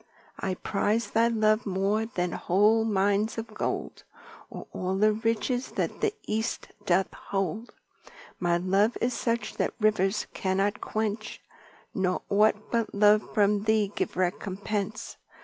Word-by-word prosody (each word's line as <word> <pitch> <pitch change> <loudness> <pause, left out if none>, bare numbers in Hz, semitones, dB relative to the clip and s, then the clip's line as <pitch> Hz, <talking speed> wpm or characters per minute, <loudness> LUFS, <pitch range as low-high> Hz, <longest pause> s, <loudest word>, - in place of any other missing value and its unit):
I 190 -1 -2
prize 210 +5 -1
thy 230 +1 +4
love 215 -1 +2
more 200 +3 0
than 180 -5 -2
whole 210 +7 +3
Mines 205 +1 +1
of 225 -1 -6
Gold, - - -3 0.5
Or - - -8
all 185 +1 -2
the 215 +2 +4
riches 230 +3 -1
that - - -2
the 430 - +2
East 220 +1 -2 0.2
doth 185 +1 +2
hold. 195 +4 -3 0.7
My 175 -1 +2
love 195 +5 +2
is 245 +1 0
such 235 0 -2
that - - -1
Rivers 210 -1 +2
cannot 195 +2 0
quench, 215 0 -3 0.5
Nor 185 -2 0
ought 210 +1 +2
but 230 -3 -1
love 210 +1 +4
from 205 0 +3
thee 215 -2 +2
give - - -2
recompense. 200 +3 -2
210 Hz, 135 wpm, -27 LUFS, 195-220 Hz, 0.7 s, thy